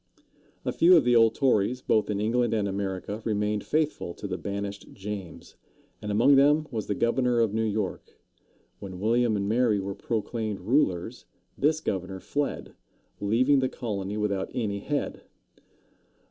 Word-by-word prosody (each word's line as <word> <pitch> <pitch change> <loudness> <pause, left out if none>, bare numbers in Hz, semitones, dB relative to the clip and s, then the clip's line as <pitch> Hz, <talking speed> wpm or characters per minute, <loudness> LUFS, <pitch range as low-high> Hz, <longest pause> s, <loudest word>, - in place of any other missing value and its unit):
A - - 0
few 175 +2 +6
of 160 - +4
the 120 0 +3
old 115 -1 +5
Tories, 125 -1 +1
both 110 - +2
in 100 -1 -1
England 115 +2 +1
and 105 -2 0
America, 100 +2 -3
remained 105 -1 -1
faithful 150 - -1
to - - -9
the 95 -2 -2
banished 100 +2 -5
James, 100 -3 -8 0.4
and 105 - -4
among 120 +7 +5
them 150 +3 +4
was 110 -4 -3
the 105 - -1
governor 120 +2 +1
of 115 -3 +2
New 110 - 0
York. 105 -3 -3 0.6
When 95 -2 -8
William 115 +2 +2
and 100 0 -2
Mary 110 -1 +2
were 100 +1 -4
proclaimed 110 -1 -3
rulers, 110 - 0 0.3
this 155 +2 +1
governor 95 - -3
fled, 145 +10 -3 0.5
leaving 125 +7 +3
the 130 -1 0
colony 105 -4 -4
without 100 -2 -1
any 105 -4 -1
head. 145 +8 -3
110 Hz, 155 wpm, -27 LUFS, 100-125 Hz, 0.6 s, few